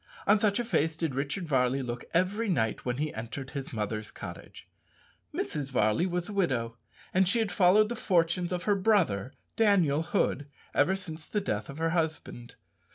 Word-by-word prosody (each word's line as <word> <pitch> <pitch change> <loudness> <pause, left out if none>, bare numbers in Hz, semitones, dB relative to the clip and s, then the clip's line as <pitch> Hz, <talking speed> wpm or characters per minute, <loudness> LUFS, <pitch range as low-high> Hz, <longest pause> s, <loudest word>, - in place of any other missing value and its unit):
On 210 - +5
such 205 -1 +2
a 240 - -1
face 160 -8 +1
did 160 -3 -2
Richard 145 +7 -3
Varley 130 -1 +2
look 120 -1 -5
every 200 +6 +1
night 110 - 0
when 125 -1 -1
he 150 +2 -2
entered 120 +5 -6
his 140 -2 -5
mother's 110 -1 -3
cottage. - - -10 0.6
Mrs. 145 -3 -3
Varley 110 - +2
was 175 -1 -2
a 210 - -6
widow, 125 -12 0 0.4
and 185 -1 +4
she 235 - +2
had 220 -3 0
followed 200 +3 +5
the 240 - -4
fortunes 175 -3 +1
of 180 -1 -2
her 210 - +3
brother, 185 - +2 0.2
Daniel 185 -9 +3
Hood, 165 -4 0 0.3
ever 190 - +3
since 160 -5 -6
the 210 - 0
death 105 - -3
of 140 - -8
her 165 0 0
husband. 160 -8 -3
165 Hz, 180 wpm, -29 LUFS, 130-190 Hz, 0.6 s, On